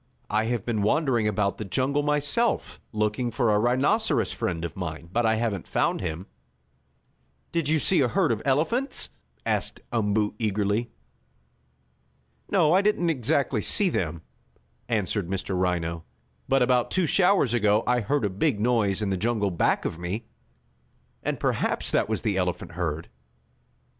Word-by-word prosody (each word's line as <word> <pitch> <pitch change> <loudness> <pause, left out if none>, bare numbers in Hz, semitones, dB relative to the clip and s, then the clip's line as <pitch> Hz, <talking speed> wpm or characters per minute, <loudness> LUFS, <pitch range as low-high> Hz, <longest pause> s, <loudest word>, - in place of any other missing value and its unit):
"I 110 +1 +2
have 120 -3 -2
been 115 -3 -1
wandering 120 -1 +2
about 100 -1 0
the - - -2
jungle 130 +8 0
myself, 150 +10 0
looking 105 +3 -1
for 120 -1 +1
a 105 - +3
rhinoceros 130 - +2
friend 85 -1 -3
of 85 - -6
mine, 85 -2 -6
but 120 -1 +2
I 110 - +3
haven't 110 -5 -2
found - - 0
him." 85 +1 -4 1.3
"Did 165 -4 0
you 160 - +4
see 165 +3 +4
a 130 - +3
herd 115 - +1
of 110 -1 -1
elephants?" 165 - 0 0.4
asked - - -1
Umboo 105 -2 +1
eagerly. 105 +1 0 1.6
"No, 170 -5 +3
I 190 - +5
didn't 200 -5 +2
exactly 135 -3 0
see 195 - +4
them," 85 - -2 0.7
answered 105 -4 -1
Mr. 95 0 -2
Rhino, 85 -2 -1 0.5
"but 135 -1 +4
about 125 -1 +2
two 185 -2 +1
showers 180 - +3
ago 105 -2 +3
I 125 0 +2
heard 120 +3 0
a - - +1
big 105 +4 0
noise 110 -3 +1
in 100 - -1
the 95 - 0
jungle 105 -1 0
back 85 - +1
of 80 - -3
me, 95 +6 -4 1.0
and - - -2
perhaps - - 0
that - - +1
was 110 - -2
the 105 -4 0
elephant 90 -2 -2
herd." 80 -2 -3
110 Hz, 155 wpm, -26 LUFS, 100-135 Hz, 1.6 s, I